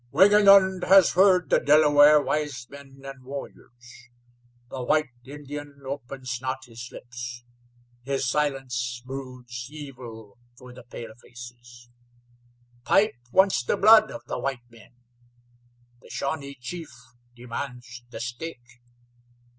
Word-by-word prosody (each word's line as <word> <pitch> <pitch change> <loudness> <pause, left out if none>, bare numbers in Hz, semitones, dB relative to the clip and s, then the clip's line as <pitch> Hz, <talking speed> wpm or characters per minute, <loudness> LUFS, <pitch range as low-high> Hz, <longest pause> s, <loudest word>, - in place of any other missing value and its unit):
"Wingenund 195 -2 +6
has 195 -1 +6
heard 185 -1 +4
the - - +5
Delaware 150 0 +6
wise 145 -5 -3
men 140 -1 -13
and 135 -1 -9
warriors. 125 -2 -11 0.6
The 130 - -5
white 150 +2 +1
Indian 145 +1 -9
opens 130 -2 -6
not 130 0 -4
his 120 0 -10
lips; 120 0 -8 0.6
his 135 0 -2
silence 125 -4 -2
broods 125 -2 -8
evil 125 -8 -11 0.2
for 125 0 -13
the 125 - -12
palefaces. 120 +1 -12 0.9
Pipe 210 - +3 0.2
wants 190 -7 +3
the - - 0
blood 215 +1 +7
of - - -9
the - - -4
white 125 -3 -4
men; 115 +1 -18 1.1
the - - -17
Shawnee 140 -1 -4
chief 160 +7 -7 0.5
demands 120 0 -7
the 115 - -8
stake. 120 0 -8
130 Hz, 115 wpm, -25 LUFS, 120-150 Hz, 1.1 s, blood